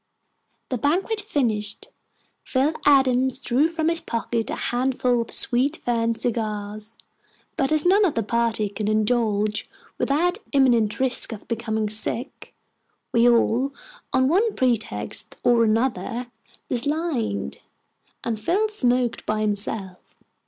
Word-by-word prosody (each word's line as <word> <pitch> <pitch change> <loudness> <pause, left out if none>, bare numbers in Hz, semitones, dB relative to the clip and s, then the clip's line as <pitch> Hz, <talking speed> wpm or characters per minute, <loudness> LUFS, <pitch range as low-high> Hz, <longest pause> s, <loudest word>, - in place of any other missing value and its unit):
The 255 - -2
banquet 375 - 0
finished, 220 - -1 0.5
Phil 275 +4 +1
Adams 260 -2 +4
drew 270 +3 +2
from 325 -1 -2
his 335 0 +3
pocket 230 0 -3
a - - -2
handful 250 -1 0
of 230 - -6
sweet 265 +6 +1
fern 230 -1 0
cigars; 215 -1 -3 0.6
but 270 +1 0
as 310 0 +4
none 395 +4 +5
of 335 - 0
the 225 - 0
party 230 -1 0
could 205 +1 -3
indulge 215 -1 0 0.3
without 350 +8 +1
imminent 240 -6 +3
risk 260 -2 +4
of 220 - -9
becoming 220 -2 -2
sick, 220 +4 -2 0.6
we 235 +1 +5
all, 240 +3 +2 0.4
on 260 0 +3
one 410 - +2
pretext 220 - -2
or 240 -1 +4
another, 230 +1 -1 0.4
declined, 250 - -2 0.6
and 225 -2 -2
Phil 390 - +1
smoked 250 - +1
by 215 0 0
himself. 205 -2 -2
240 Hz, 125 wpm, -23 LUFS, 215-275 Hz, 0.6 s, none